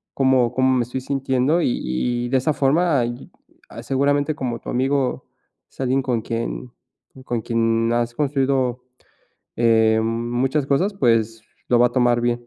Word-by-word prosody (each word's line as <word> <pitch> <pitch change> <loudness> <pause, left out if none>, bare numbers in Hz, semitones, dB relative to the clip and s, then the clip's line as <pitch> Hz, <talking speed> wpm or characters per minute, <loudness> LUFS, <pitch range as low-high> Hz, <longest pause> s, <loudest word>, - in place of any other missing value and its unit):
cómo 130 -3 +2
cómo 130 0 +2
me 125 - +1
estoy 125 +2 -5
sintiendo". 135 +4 0
Y - - +1
y 120 - -2
de 130 - +2
esa 150 +4 0
forma, 145 0 +2
y 120 +1 -7 0.4
ah, - - -9
seguramente 145 +2 +1
como 125 -5 -4
tu - - -9
amigo 135 +1 -1 0.4
es - - -28
alguien 130 +1 +1
con 125 -3 -1
quien 115 +2 -4 0.5
con 120 -2 -2
quien 115 0 0
has 120 0 -1
construido, 135 -3 0 0.7
eh, 110 -1 +3
muchas 120 +5 -1
cosas, 180 +9 +1
pues 115 - +1 0.3
lo 120 - +3
va 120 - +5
a - - -18
tomar 120 -2 +2
bien. 120 0 -1
125 Hz, 160 wpm, -21 LUFS, 120-135 Hz, 0.7 s, va